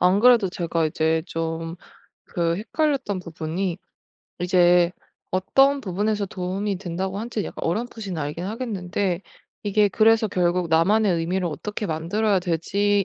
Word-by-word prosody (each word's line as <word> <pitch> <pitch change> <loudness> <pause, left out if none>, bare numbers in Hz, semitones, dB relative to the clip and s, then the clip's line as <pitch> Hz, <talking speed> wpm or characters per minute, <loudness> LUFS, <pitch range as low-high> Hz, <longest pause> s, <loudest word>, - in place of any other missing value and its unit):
안 185 +3 +4
그래도 235 -5 +6
제가 170 -2 -1
이제 160 +1 +1
좀 165 0 -3 0.6
그 170 -1 +1
헷갈렸던 265 - -1
부분이 170 +1 -3 0.6
이제 175 -1 +4 0.6
어떤 275 +1 +5
부분에서 205 +1 -1
도움이 190 +1 -3
된다고 190 +2 -3
한 235 +2 -5
지 215 - -2
약간 - - -7
어렴풋이 215 +2 -3
알긴 150 +3 -4
하겠는데 195 -5 -2 0.4
이게 205 0 +3
그래서 220 +3 +4
결국 180 -2 0
나만의 190 +5 +3
의미를 175 +2 -1
어떻게 205 +6 -4
만들어야 185 +6 0
될 175 -2 0
지에 200 +3 +1
185 Hz, 315 characters per minute, -24 LUFS, 170-210 Hz, 0.6 s, 그래도